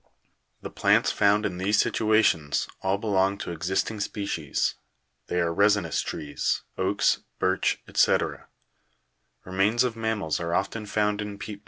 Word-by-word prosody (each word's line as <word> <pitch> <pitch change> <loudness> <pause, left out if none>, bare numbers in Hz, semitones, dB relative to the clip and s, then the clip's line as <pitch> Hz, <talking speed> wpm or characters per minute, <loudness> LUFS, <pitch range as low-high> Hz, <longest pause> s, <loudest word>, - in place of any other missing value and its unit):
The - - -6
plants - - +3
found 105 +1 +3
in 90 - -3
these 100 +3 +1
situations 105 -11 +2
all 95 +1 +1
belong 100 -2 +1
to - - -5
existing 95 +6 -2
species; 100 -8 -2 0.5
they 90 - -1
are 85 -1 +1
resinous 100 -3 +2
trees, 75 -1 -2
oaks, 95 +2 +1 0.2
birch, - - 0
&c. - - +5 1.3
Remains 100 +6 +2
of 125 -2 -1
mammals 110 -8 -1
are 85 0 -2
often 105 +2 -2
found 105 0 0
in 105 -1 -6
peat. 100 0 -7
100 Hz, 135 wpm, -26 LUFS, 90-105 Hz, 1.3 s, c